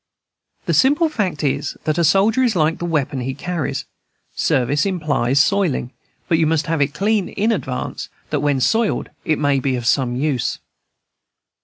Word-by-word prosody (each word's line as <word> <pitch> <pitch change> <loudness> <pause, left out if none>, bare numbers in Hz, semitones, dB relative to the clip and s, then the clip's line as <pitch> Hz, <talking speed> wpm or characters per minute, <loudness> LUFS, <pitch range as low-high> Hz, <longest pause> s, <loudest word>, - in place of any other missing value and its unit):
The - - 0
simple 295 +5 +4
fact 185 - -2
is, 140 - -1
that 155 +1 0
a - - +3
soldier 200 - +3
is 240 -5 +2
like 160 -1 +1
the 175 - -3
weapon 145 -5 -1
he 130 +2 -3
carries; 170 0 -3 0.5
service 135 +3 +1
implies 150 -9 0
soiling, 160 -7 +1 0.4
but 165 - +2
you 160 - +3
must 160 -1 +1
have 165 -2 -1
it 140 +1 0
clean 205 +2 +1
in 215 +3 0
advance, 135 - -4 0.2
that 150 - +1
when 145 -2 +1
soiled 220 - +1
it 155 - +1
may 145 -2 +2
be 130 0 0
of 120 -2 -4
some 125 0 +1
use. 135 -2 -1
155 Hz, 170 wpm, -20 LUFS, 135-195 Hz, 0.5 s, simple